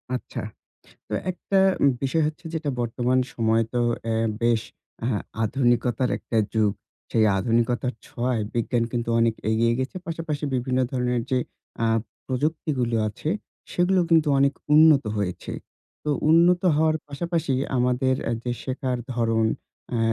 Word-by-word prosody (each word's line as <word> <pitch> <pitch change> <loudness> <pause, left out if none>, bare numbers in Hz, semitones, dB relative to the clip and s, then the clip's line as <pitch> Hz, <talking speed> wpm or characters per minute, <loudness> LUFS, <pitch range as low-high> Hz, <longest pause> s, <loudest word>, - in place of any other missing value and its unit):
আচ্ছা। - - -6 0.7
তো - - -3 0.2
একটা 195 +2 -1 0.4
বিষয় 155 +4 +1
হচ্ছে, 155 +3 -5
যেটা 155 -3 -1
বর্তমান 120 +2 +1 0.2
সময়ে 115 0 +2
তো 120 - +2 0.3
এ - - +1 0.3
বেশ 115 -1 +3 0.4
আ - - 0 0.4
আধুনিকতার 120 +1 +1
একটা 115 - -4 0.2
যুগ। 105 -2 +3 0.4
সেই 110 -1 +3
আধুনিকতার 120 +3 +1
ছোঁয়ায়, 120 -2 -1
বিজ্ঞান 120 0 +1
কিন্তু 120 -1 -2
অনেক 115 -1 +3 0.2
এগিয়ে 115 +1 +3
গেছে। 130 +7 -3
পাশাপাশি 160 -3 -3
বিভিন্ন 130 +1 0
ধরনের 125 -2 0
যে, 130 - +3 0.5
আ - - +3 0.4
প্রযুক্তিগুলো 130 -3 -1
আছে, 110 +8 -6 0.4
সেগুলো 180 +1 +3
কিন্তু 160 -2 +5
অনেক 140 +1 +3 0.2
উন্নত 155 -4 +7
হয়েছে। 95 -3 -3 0.5
তো 150 - 0 0.2
উন্নত 175 +2 +5
হওয়ার 155 0 +3
পাশাপাশি 165 0 -2 0.2
আমাদের 125 +1 +2 0.2
আ - - 0
যে, 120 - -2
শেখার 130 -1 -2 0.2
ধরণ 115 -1 +1 0.5
আ - - 0
125 Hz, 135 wpm, -24 LUFS, 115-150 Hz, 0.7 s, উন্নত